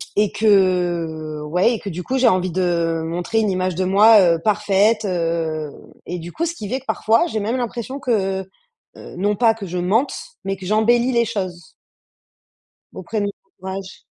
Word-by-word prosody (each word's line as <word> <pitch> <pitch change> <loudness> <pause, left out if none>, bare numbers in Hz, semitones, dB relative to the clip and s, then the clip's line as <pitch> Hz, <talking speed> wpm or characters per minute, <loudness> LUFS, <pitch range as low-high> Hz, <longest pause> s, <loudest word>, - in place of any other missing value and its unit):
et 210 -1 +2
que, 175 -7 +1
ouais 180 +10 +2
et - - -6
que 200 - -6
du 180 +1 -5
coup, 265 +7 -2
j'ai 255 -2 +4
envie 185 -3 +2
de 170 -2 0
montrer 175 +7 -1
une 215 -2 +1
image 185 -1 -1
de 185 +2 -1
moi, 210 +3 +6
heu, 170 -2 +3
parfaite, 210 +1 +2
heu 165 -4 -2 0.4
et 180 - -4
du 170 +1 -8
coup, 335 - -2
ce 335 +1 -3
qui 210 - -7
fais 260 - -1
que 265 - -23
parfois, 230 +10 +2
j'ai 220 - -3
même 225 +5 -1
l'impression 245 +3 -4
que, 195 -7 0 0.6
heu, - - -11
non 205 +2 +1
pas 225 +1 +4
que 205 -4 -8
je 180 +1 -4
mente, 205 +10 +1 0.3
mais 195 0 -3
que 185 - -10
j'embellis 235 +5 +2
les 235 -1 +2
choses 185 -6 -5 1.2
auprès 210 +4 -4
de 205 - 0
mon 200 - -2 0.3
entourage. 190 0 -7
195 Hz, 190 wpm, -20 LUFS, 175-225 Hz, 1.2 s, moi